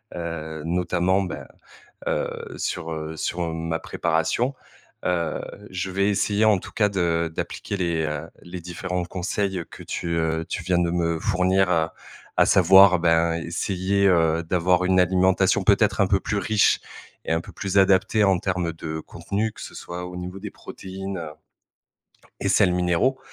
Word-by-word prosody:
Heu, 80 -2 -5
notamment 90 +2 +1
ben, 90 - -6 0.6
heu, - - -3
sur, 80 - -3
heu, 80 0 -5
sur 85 -1 -2
ma 80 0 -2
préparation. 85 +11 0 0.5
Heu, 85 -3 0 0.3
je 95 +1 -3
vais 100 +2 +1
essayer 105 +1 +1
en 105 -3 +5
tout - - -11
cas 105 -2 +2
de 85 -4 0
d'appliquer 100 - -4
les, 85 -3 0
heu, 75 +1 -4 0.2
les 85 0 -8
différents 90 +1 -4
conseils 95 +1 -2
que - - -10
tu, 85 - -4
heu, 80 0 0
tu 90 - -3
viens 90 0 +2
de 85 - +1
me 85 -2 0
fournir. 95 -1 +2
Heu, 80 -1 +2 0.5
à - - +6
savoir 95 0 +7
ben 85 0 +3
essayer, 95 +4 0
heu, 85 -2 +3
d'avoir 90 +1 +2
une 95 0 +3
alimentation 90 +1 +3
peut-être - - +3
un - - +4
peu - - +2
plus - - -2
riche 110 -1 +3 0.5
et - - -2
un 80 - +1
peu - - -12
plus 100 0 -2
adaptée. 95 +2 +4
En 95 -2 +3
termes 90 -3 -1
de 80 -1 -5
contenu, 105 +6 -3
que - - -12
ce - - -8
soit 90 +1 -6
au 90 - -8
niveau 90 +2 -6
des 105 0 -7
protéines, 95 0 -7
heu 80 -2 -6 1.1
et - - 0
sels 90 - +4
minéraux 90 +9 +1
90 Hz, 165 wpm, -24 LUFS, 85-95 Hz, 1.1 s, savoir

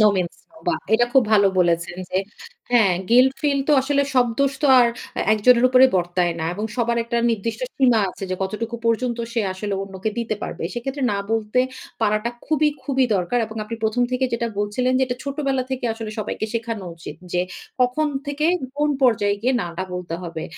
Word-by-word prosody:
No 215 - +7
means 180 -2 -2
no 330 - -22
বা 345 - +3 0.2
এটা 240 +2 +4
খুব 265 -1 +6
ভালো 205 -2 +6
বলেছেন 170 0 +1
যে, 185 - +1 0.5
হ্যাঁ 225 -6 +5 0.2
গিল্ট 255 +2 +6
ফিল 285 -2 +2
তো - - +5
আসলে 280 +1 +1
সব 250 -1 +5
দোষ 275 0 +2
তো - - +4
আর 245 - +6 0.3
এ্যাঁ - - -1
একজনের 235 +3 +4
উপরে 255 +1 +6
বর্তায় 175 -1 0
না - - -1
এবং 210 +3 -4
সবার 235 -1 +1
একটা 235 +1 -2
নির্দিষ্ট 230 - -2 0.2
সীমা 245 -4 +4
আছে 195 - -7
যে - - +1
কতটুকু 220 +5 -3
পর্যন্ত 235 +1 +1
সে 230 - +1
আসলে 200 +2 -3
অন্যকে 195 +2 -4
দিতে 230 -2 -1
পারবে। - - -5
সেক্ষেত্রে 270 +4 -4
না 200 - -1
বলতে 225 +2 +1 0.4
পারাটা 215 +2 +1 0.2
খুবই, 305 0 +3 0.2
খুবই 265 -2 +2
দরকার। 185 +7 0
এবং 220 +1 -10
আপনি 220 +2 -5
১ম 220 +3 +1
থেকে 255 +1 +1
যেটা 235 0 0
বলছিলেন, 210 +5 0
যে - - +2
এটা 245 -1 -3
ছোটবেলা 275 -2 -1
থেকে 260 -1 -3
আসলে 225 -1 -6
সবাইকে 215 0 -3
শেখানো 230 -3 -3
উচিত 160 -2 -9 0.2
যে 180 - +2 0.4
কখন 250 +5 +2 0.2
থেকে 290 +2 0 0.3
কোন 295 0 +2
পর্যায়ে 205 -5 +3
গিয়ে 255 +2 +2
না - - -3
এটা 185 +2 -3
বলতে 180 -2 -4
হবে। 165 -2 -5
230 Hz, 200 wpm, -22 LUFS, 205-255 Hz, 0.5 s, No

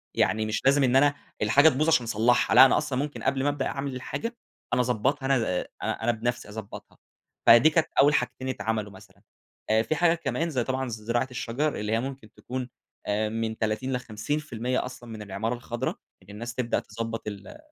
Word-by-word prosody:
يعني 110 +3 +2
مش 110 0 -2
لازم 140 +1 +5
إن 125 -1 +3
أنا 145 +1 +5 0.3
الحاجة 145 +3 +6
تبوظ 155 +2 0
عشان 135 -7 +4
أصلحها، 115 +2 +2
لأ 130 +2 +11
أنا - - +4
أصلًا 130 -2 -1
ممكن 145 +1 -4
قبل 135 0 +1
ما 145 - +2
أبدأ 145 -2 -2
أعمل 135 -1 -4
الحاجة، 230 - -5 0.4
أنا 125 - +3
أضبطها 130 +4 0
أنا 135 0 +3
ب 90 -6 -1 0.2
أنا 115 +1 0
بنفسي 120 0 -3
أضبطها، 105 -1 -9 0.5
فدي 120 +6 +8
كانت 160 -1 +2
أوّل 145 +1 +5
حاجتين 130 0 -1
اتعملوا 110 -4 -2
مثلًا. 95 - -17 0.5
آآ 110 +1 +4
في 155 - -1
حاجات 170 0 +2
كمان 165 +1 -1
زي 130 -6 0
طبعًا 130 +1 -2
زراعة 115 +3 -1
الشجر، 125 +5 -2
اللي 105 +1 -3
هي 115 - +2
ممكن 130 -3 -6
تكون 130 0 -6 0.4
آآ 105 +1 0
من 110 0 -3
30 110 +5 -1
ل50% 125 +1 -2
أصلًا 120 -2 -10
من 110 -1 -7
العمارة 105 +3 -3
الخضرا، 120 +1 -4 0.3
إن 95 - -21
الناس 115 +3 -6
تبدأ 120 -2 0
تضبط 115 +2 -5
ال 100 - -7
125 Hz, 190 wpm, -26 LUFS, 110-135 Hz, 0.5 s, لأ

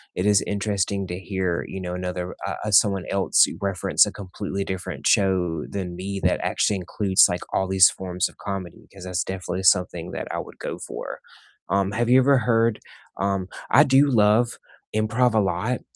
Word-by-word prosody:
it 90 - -1
is 105 -2 +4
interesting 100 -1 -1
to 90 +1 -5
hear, 95 -3 -2
you 95 - -6
know, 90 -1 -5
another 90 0 -4
uh - - -3
uh, 105 - -2
someone 100 -2 +4
else 100 -1 +4 0.2
reference 100 -2 +2
a - - -5
completely 100 0 -5
different 95 -2 -6
show 90 -5 +2
than 90 -3 -5
me 95 +2 -5
that - - +2
actually 105 - +1
includes, 95 +1 +3
like, 90 - -3
all 95 - +1
these 95 -1 +6
forms 90 -1 -2
of - - -21
comedy, 95 -4 -7
'cause 95 -2 -12
that's 90 -1 -1
definitely 95 0 -5
something 90 -2 +2
that - - -5
I - - -3
would - - -9
go - - -5
for. - - -7 0.5
Um, 100 +1 +1
have 120 +2 -1
you 130 +1 +6
ever 135 0 +4
heard 115 -1 +1 0.4
Um, 95 -1 -1 0.2
I 140 +6 +7
do 135 +1 +4
love 115 +1 +3 0.4
improv 110 +2 +1
a - - +5
lot, 100 +6 -1
95 Hz, 185 wpm, -23 LUFS, 90-105 Hz, 0.5 s, I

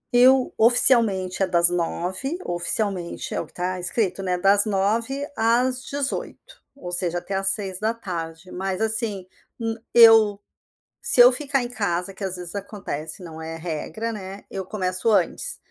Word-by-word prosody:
Eu 255 +1 +4
oficialmente, 220 -6 +4
é 190 - +2
das 170 -1 +6
9h 185 - -3
oficialmente, 175 +1 -2
é - - -2
o - - -9
que - - -22
tá 180 +1 -4
escrito, 190 +2 -1
né, 180 -1 -2
das 200 +2 +5
9h 225 +7 -2
às 250 +3 +1
18h, 285 - -3
ou 180 -10 -9
seja, 175 -1 +3
até 195 +3 -7
às 195 0 0
18h. 190 -4 -3
Mas, 190 0 -4
assim, 220 -4 0 0.3
n 225 -1 -3 0.2
eu 225 -3 +6 0.6
se 245 - +4
eu 245 +1 +8
ficar 275 -1 -1
em 240 - -6
casa 195 -4 -3
que, 195 - -16
às 190 -1 -2
vezes, 180 0 -5
acontece, 190 -5 -6
não 160 -1 -10
é 165 0 -7
regra, 175 +8 -5
né, 195 -2 -9
eu 190 -1 -6
começo 185 +1 -1
antes. 195 -5 0
195 Hz, 155 wpm, -22 LUFS, 180-230 Hz, 0.6 s, eu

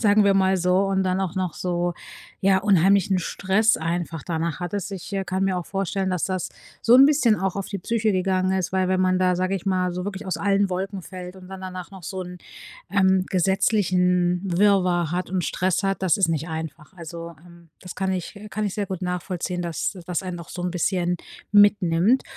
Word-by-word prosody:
sagen 210 -1 +5
wir 200 -1 +4
mal 190 -1 +3
so, 180 +1 +2
und 190 -1 +1
dann 185 0 0
auch 190 -4 -2
noch 185 -3 -2
so, 175 -1 -1 0.5
ja, 190 0 +4
unheimlichen 195 -1 +3
Stress 200 +5 +2
einfach 165 -1 -3
danach 165 0 -3
hattest. 195 +2 -4
Ich, 195 +1 -7
äh, 195 -1 -1
kann 190 +1 -2
mir 190 -1 +1
auch 175 - -6
vorstellen, 195 0 -2
dass 180 -2 -1
das 185 -3 -2 0.3
so 235 - +5
'n 270 +2 +9
bisschen 275 -7 +4
auch 195 0 -1
auf 195 - -3
die 200 - -5
Psyche 220 +2 0
gegangen 185 0 +1
ist, 185 - -1
weil, 185 -1 +1
wenn 185 0 +1
man 185 0 +2
da, 180 -1 +3
sage 185 +2 0
ich 190 - -9
mal, 185 -2 +1
so 180 +1 -4
wirklich 200 0 -5
aus 185 - -1
allen 200 -1 +1
Wolken 190 +1 -3
fällt 180 0 -8
und 185 -1 -13
dann 190 0 -8
danach 185 0 -7
noch 190 -3 -12
so 190 +1 -4
'n, 180 0 -9 0.5
ähm, 190 -2 +3
gesetzlichen 180 -2 +2
Wirrwarr 180 -3 +2
hat 180 +2 -2
und 185 -2 -1
Stress 185 +1 0
hat, 195 0 -1
das 180 -4 +3
ist 190 -4 +2
nicht 160 0 -1
einfach. 160 0 -7
Also, 170 -1 -8
ähm, 170 -2 -17
das 180 - -9
kann 190 0 -1
ich 185 +2 -5
kann 215 +2 -2
ich 200 - -2
sehr 205 -2 -2
gut 185 -1 -5
nachvollziehen, 180 0 -3
dass 175 +3 -3
das 180 -1 -2
einen 180 -2 -5
auch 170 - -10
so 175 - -6
'n 180 - -1
bisschen 180 0 0 0.3
mitnimmt 205 +2 +4
185 Hz, 215 wpm, -24 LUFS, 175-195 Hz, 0.5 s, n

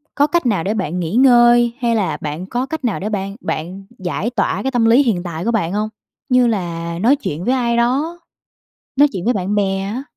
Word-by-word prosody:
có 290 +1 +3
cách 340 0 0
nào 205 -9 +1
để 200 - -1
bạn 180 -5 -2
nghỉ 170 +3 -3
ngơi, 240 -2 +5
hay 235 -2 +1
là 185 -9 -1
bạn 155 +4 -4
có 245 +6 -2
cách 315 +1 -6
nào 230 - -1
để 205 - -3
bạn 195 -1 -3
bạn 180 +3 -5
giải 185 +3 -2
tỏa 205 -4 -1
cái 265 - -1
tâm 240 -3 +2
lý 235 +5 +5
hiện 205 -9 0
tại 170 -1 -5
của 235 - +1
bạn 195 -6 -1
hông? 210 +1 -1 0.4
Như 250 -1 +4
là 170 -5 -3
nói 240 +9 +4
chuyện 175 - -5
với 250 - +2
ai 235 -2 0
đó, 280 +9 0 0.8
nói 290 +2 +6
chuyện 185 -3 -5
với 245 - +2
bạn 195 0 -2
bè 195 -2 0
á. 210 +7 -4
215 Hz, 230 wpm, -18 LUFS, 185-245 Hz, 0.8 s, nói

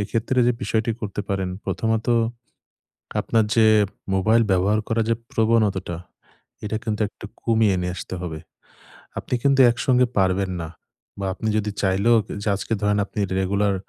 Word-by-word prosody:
এক্ষেত্রে 115 +5 -1
যে 125 - +4
বিষয়টি 110 +2 0
করতে 105 -1 -4
পারেন, 95 -2 -1 0.2
প্রথমত 115 0 -1 1.1
আপনার 115 -1 +2
যে 110 -1 +5 0.5
মোবাইল 110 +4 +3
ব্যবহার 100 +3 +2
করা 115 0 +1
যে 115 - +3 0.2
প্রবণতাটা, 105 -6 +1 0.7
এটা 110 +1 -2
কিন্তু 110 -2 -2
একটু 105 - -11 0.2
কমিয়ে 110 -4 +3
নিয়ে 90 0 -2
আসতে 95 - -6
হবে। 80 -3 -5 0.8
আপনি 125 - -3
কিন্তু 140 -1 +3
একসঙ্গে 125 0 +2
পারবেন 95 0 +1
না। 80 - -5 0.5
বা 100 - -2
আপনি 110 - -5
যদি 105 0 -1
চাইলেও 100 +4 +3 0.3
যে - - -4
আজকে 110 - -3
ধরেন 105 0 +2
আপনি 105 - -7 0.2
রেগুলার 100 +1 +1
105 Hz, 145 wpm, -23 LUFS, 95-115 Hz, 1.1 s, যে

